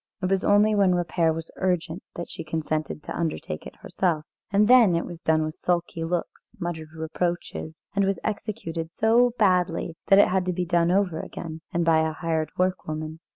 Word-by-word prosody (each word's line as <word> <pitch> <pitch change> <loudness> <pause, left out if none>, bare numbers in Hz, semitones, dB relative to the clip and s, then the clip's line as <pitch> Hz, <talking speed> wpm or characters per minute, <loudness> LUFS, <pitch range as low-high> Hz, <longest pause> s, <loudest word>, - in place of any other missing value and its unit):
It 185 0 -1
was 195 0 +2
only 205 +1 +4
when 195 -3 +4
repair 170 -1 +1
was 165 0 -5
urgent 180 -2 -1
that 170 - -5
she - - -6
consented 155 -1 -3
to - - -6
undertake 155 - -3
it - - -12
herself, 165 -5 0 0.2
and 205 +1 +3
then 235 -7 +7
it 170 - 0
was 175 -1 -9
done 155 0 +2
with 155 0 -3
sulky 170 -1 -1
looks, 170 +1 -4
muttered 165 -3 -4
reproaches, 160 0 -3 0.2
and 200 - +3
was 195 0 +1
executed 195 -6 -4
so 230 +5 +3
badly 180 -5 +2
that 195 - +7
it 200 - +6
had 185 0 +1
to 180 - +1
be 180 0 -1
done 170 -1 +2
over 180 -3 +1
again, 160 -1 -7
and 170 -1 0
by 165 -1 +5
a 160 0 0
hired 160 -1 -1
workwoman. 155 -4 -2
175 Hz, 190 wpm, -25 LUFS, 160-190 Hz, 0.2 s, then